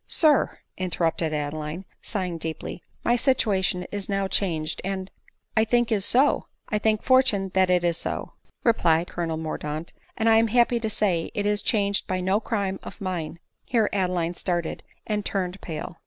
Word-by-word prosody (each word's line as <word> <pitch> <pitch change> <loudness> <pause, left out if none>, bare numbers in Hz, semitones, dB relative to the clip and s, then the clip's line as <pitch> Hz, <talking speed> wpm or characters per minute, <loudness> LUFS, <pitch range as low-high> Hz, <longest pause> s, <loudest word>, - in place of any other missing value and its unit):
• - - -54
" - - -48
Sir! 305 -5 +4
" - - -51
interrupted 165 -2 0
Adeline, 150 +4 -3 0.2
sighing 180 -5 -3
deeply, 160 +2 -5
" - - -39
my 240 - +4
sit 260 +1 +3
uation 190 -3 +1
is 205 -1 -4
now 195 -1 0
changed; 160 -6 0
and 190 0 -3 0.2
" - - -50
" - - -47
It 235 +2 +3
is 205 -3 +2
so, 270 +4 +4 0.2
I 210 - +1
thank 215 0 +1
fortune 255 -8 +3
that 190 -1 +3
it 180 -1 +3
is 170 -1 +2
so," - - -3 0.3
replied 170 -8 +3
colonel 165 -2 -2
Mordaunt; 155 0 -4
" - - -35
and 225 - +1
I 225 0 +6
am 225 0 +4
happy 240 +1 +3
to 220 -1 -2
say, 185 -6 +1
it 205 - -1
is 210 0 +1
changed 200 -2 +1
by 185 0 -1
• - - -3
no 190 +3 +2
crime 200 -4 -2
of - - -10
mine." 175 -4 -3 0.3
(Here 225 -4 +1
Adeline 180 -3 0
started 175 -1 -2 0.2
and 210 -1 -1
turned 190 -1 -2
pale.) 165 0 -6
190 Hz, 200 wpm, -25 LUFS, 170-215 Hz, 0.3 s, I